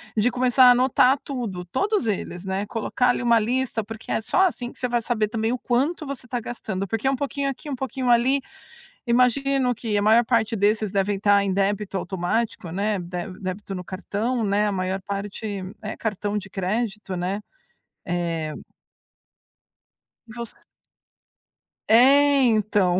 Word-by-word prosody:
De 220 +2 +3
começar 255 +1 +4
a 250 - +9
anotar 255 +1 +4
tudo, 225 -10 -5
todos 395 - 0
eles, 190 -3 -3
né. 190 +1 -2
Colocar 235 +3 0
ali 245 - +1
uma 235 -1 +5
lista, 240 0 -1
porque 220 +2 -8
é - - 0
só 370 - +3
assim 245 -8 -5
que - - -9
você 250 - 0
vai 240 -1 0
saber 220 -2 0
também 225 +1 -1
o 250 - -1
quanto 280 +8 0
você 275 -3 -6
tá 245 0 -2
gastando, 205 -5 -4
porque 225 +5 -2
é - - +4
um - - 0
pouquinho 280 +1 -2
aqui, 275 +3 -7
um 280 - -2
pouquinho 260 0 -3
ali. 245 +4 +4 0.7
Imagino 250 +1 +2
que 220 -2 -2
a - - +2
maior 220 +3 +5
parte 230 -1 +1
desses 210 0 +1
devem 200 0 0
tá 200 0 +4
em 195 - 0
débito 200 +1 -1
automático, 185 +2 -2
né, 205 +3 0
dé 175 0 -5
débito 195 +1 -5
no 180 - -5
cartão, 215 +6 -2
né. 205 +1 +2
A - - 0
maior 190 0 -2
parte, 200 0 -4 0.2
é 215 0 -5
cartão 210 -1 -2
de 195 -1 -11
crédito, 205 +1 -2
né. 180 +3 -2 0.7
É 170 -3 -2 1.8
Você 235 0 -7 1.2
É, 275 +5 +6
então. 210 -5 +2
220 Hz, 165 wpm, -24 LUFS, 195-250 Hz, 1.8 s, a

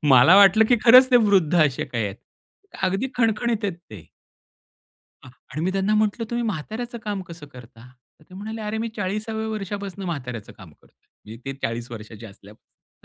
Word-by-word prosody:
मला 140 +5 +7
वाटलं 200 +2 +7
की 245 - +5
खरंच 255 +2 +8
ते 250 - +7
वृद्ध 200 -8 +3
असे 135 -3 -1
काही 115 -3 -3
आहेत. 100 -1 -5 0.7
अगदी 195 +6 0
खणखणीत 230 -1 0
आहेत 200 - 0 0.2
ते. 100 -7 -11 1.2
अ, 130 - -12 0.2
आणि 155 - -5
मी 185 - +1
त्यांना 195 +2 0
म्हटलं 215 +2 0
तुम्ही 235 0 -1
म्हाताऱ्याचं 225 +6 -5
काम 205 -2 -3
कसं 165 -3 -10
करता? 120 -1 -14 0.3
तर - - -21
ते 185 - -13
म्हणाले 220 +3 -7
अरे 215 +1 -3
मी 230 - -3
40व्या 215 +2 -3
वर्षापासून 200 -2 -5
म्हाताऱ्याचं 125 - -6
काम 95 -6 -15
करतोय. - - -29 0.2
म्हणजे 110 +2 -11
ते 135 - -4
40 115 +1 -4
वर्षाचे 110 0 -10
असल्यापासून. 105 +1 -19
195 Hz, 175 wpm, -23 LUFS, -, 1.2 s, खरंच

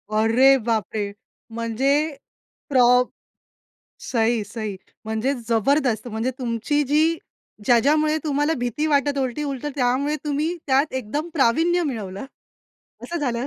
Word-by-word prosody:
अरे 240 +5 +5
बाप 220 -5 +1
रे! 205 -1 -2 0.4
म्हणजे 230 +4 -1 0.8
प्रॉ 255 -3 +4 1.2
सही, 230 -2 0
सही 215 -2 -5 0.3
म्हणजे 220 +5 -1 0.2
जबरदस्त, 240 0 +1
म्हणजे 225 +3 -2
तुमची 250 +4 0
जी 315 +3 +3 0.5
ज्या-ज्यामुळे 300 +6 +3
तुम्हाला 295 +1 +1
भीती 245 +6 -1
वाटत 285 -1 +1
उलटी 260 +2 -2
उलट 275 0 -4
त्यामुळे 275 +3 +1
तुम्ही 300 +4 -1
त्यात 275 +2 +2
एकदम 260 +7 -3
प्रावीण्य 325 +7 +3
मिळवलं. 215 - -4 0.8
असं 345 - -5
झालं, 245 -1 -1
260 Hz, 115 wpm, -23 LUFS, 230-295 Hz, 1.2 s, अरे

